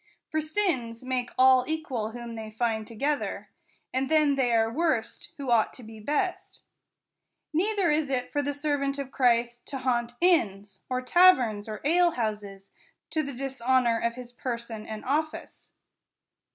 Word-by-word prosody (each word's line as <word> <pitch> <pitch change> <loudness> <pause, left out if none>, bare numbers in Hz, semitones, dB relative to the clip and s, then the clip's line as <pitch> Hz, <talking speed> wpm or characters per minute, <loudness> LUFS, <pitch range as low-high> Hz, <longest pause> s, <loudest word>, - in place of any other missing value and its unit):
For 315 - +1
sins 300 - -1
make 255 -1 -2
all 260 0 +6
equal 290 -9 -2
whom 235 0 -7
they 220 -1 -6
find 220 -1 -1
together; 280 +6 -2 0.4
and 260 +1 0
then 305 -2 +4
they 265 -3 +1
are 225 0 +2
worst, 300 -8 -1
who 275 -3 -3
ought 225 -2 +3
to 250 - -11
be 220 0 -11
best. 300 - -2 0.9
Neither 385 +1 +2
is 300 -1 +1
it 250 -2 -2
for 290 - 0
the 285 0 -1
servant 285 -1 -1
of 275 -2 -5
Christ 240 -1 +1
to 275 - -4
haunt 240 -2 -1
inns, 205 - +2
or 255 0 -1
taverns, 250 - +4
or 215 - -6
alehouses, 215 - 0 0.4
to 315 - +1
the 280 -2 -5
dishonor 255 -2 +1
of 235 0 -1
his 250 -1 -9
person 235 -3 -5
and 215 -1 -7
office. 310 +4 -3
255 Hz, 150 wpm, -27 LUFS, 230-290 Hz, 0.9 s, all